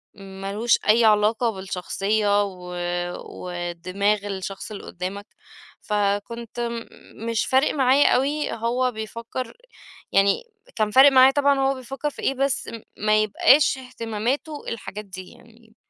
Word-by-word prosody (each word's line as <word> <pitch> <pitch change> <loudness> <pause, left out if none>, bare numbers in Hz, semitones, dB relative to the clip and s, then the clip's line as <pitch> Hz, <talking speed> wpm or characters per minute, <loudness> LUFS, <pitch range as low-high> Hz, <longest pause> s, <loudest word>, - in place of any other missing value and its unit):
ما 195 0 -8
لهوش 230 +3 +3
أي 225 +2 +6
علاقة 220 +2 +3
بالشخصية 200 +2 0
و 180 -2 -7 0.5
ودماغ 180 +4 -2
الشخص 195 +1 -6
اللي 205 - -7
قدامك. 190 +3 -6 0.6
فكنت 215 +3 -2 0.6
مش 230 -2 0
فارق 265 +3 +2
معايا 270 0 +4
أوي 290 +4 0
هو 245 +3 0
بيفكر 230 - -6 0.5
يعني 195 - +3 0.3
كان 215 -1 0
فارق 270 +4 +8
معايا 260 0 +7
طبعًا 280 -1 +2
هو 270 0 +2
بيفكر 270 +3 -4
في - - -11
إيه، - - +1
بس 275 0 -1
م 230 -2 -7 0.2
ما 215 0 +4
يبقاش 270 +7 +4
اهتماماته 250 +4 -4
الحاجات 210 -2 -6
دي 185 -1 -10
يعني. 225 -1 -20
220 Hz, 130 wpm, -23 LUFS, 200-255 Hz, 0.6 s, فارق